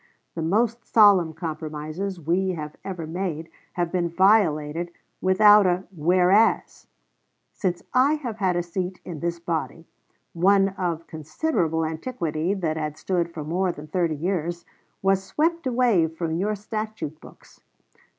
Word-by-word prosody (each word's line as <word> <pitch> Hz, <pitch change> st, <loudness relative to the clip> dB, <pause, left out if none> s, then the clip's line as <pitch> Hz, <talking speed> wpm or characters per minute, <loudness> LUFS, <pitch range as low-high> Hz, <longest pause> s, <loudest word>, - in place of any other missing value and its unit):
The 165 Hz, -, -4 dB
most 225 Hz, +8 st, +1 dB
solemn 200 Hz, -7 st, +5 dB
compromises 160 Hz, +3 st, -5 dB
we 180 Hz, +4 st, 0 dB
have 150 Hz, -3 st, -6 dB
ever 180 Hz, -4 st, -5 dB
made 165 Hz, -1 st, -4 dB, 0.2 s
have 175 Hz, -1 st, -1 dB
been 175 Hz, -2 st, 0 dB
violated 170 Hz, -4 st, +2 dB, 0.3 s
without 205 Hz, +2 st, +6 dB
a 180 Hz, +1 st, +1 dB
whereas. 180 Hz, +7 st, +2 dB, 0.7 s
Since 180 Hz, -4 st, -2 dB
I 270 Hz, +4 st, +4 dB
have 245 Hz, -8 st, -5 dB
had 190 Hz, -4 st, +1 dB
a 175 Hz, -, 0 dB
seat 180 Hz, +1 st, -4 dB
in 170 Hz, -4 st, -6 dB
this 170 Hz, +1 st, -2 dB
body, 165 Hz, -1 st, -3 dB, 0.5 s
one 195 Hz, +3 st, +4 dB
of 175 Hz, -4 st, -3 dB
considerable 160 Hz, -, -1 dB
antiquity, 160 Hz, 0 st, -2 dB
that 160 Hz, -5 st, -2 dB
had 150 Hz, -1 st, -3 dB
stood 175 Hz, -2 st, -1 dB
for 160 Hz, -2 st, -6 dB
more 180 Hz, +4 st, 0 dB
than 150 Hz, -2 st, -10 dB
thirty 165 Hz, 0 st, 0 dB
years, 170 Hz, +1 st, -2 dB, 0.4 s
was 195 Hz, 0 st, +2 dB
swept 325 Hz, -, 0 dB
away 235 Hz, -9 st, +3 dB
from 160 Hz, 0 st, -4 dB
your 200 Hz, +6 st, 0 dB
statute 215 Hz, -6 st, -5 dB
books.... -, -, -17 dB
175 Hz, 140 wpm, -24 LUFS, 160-195 Hz, 0.7 s, without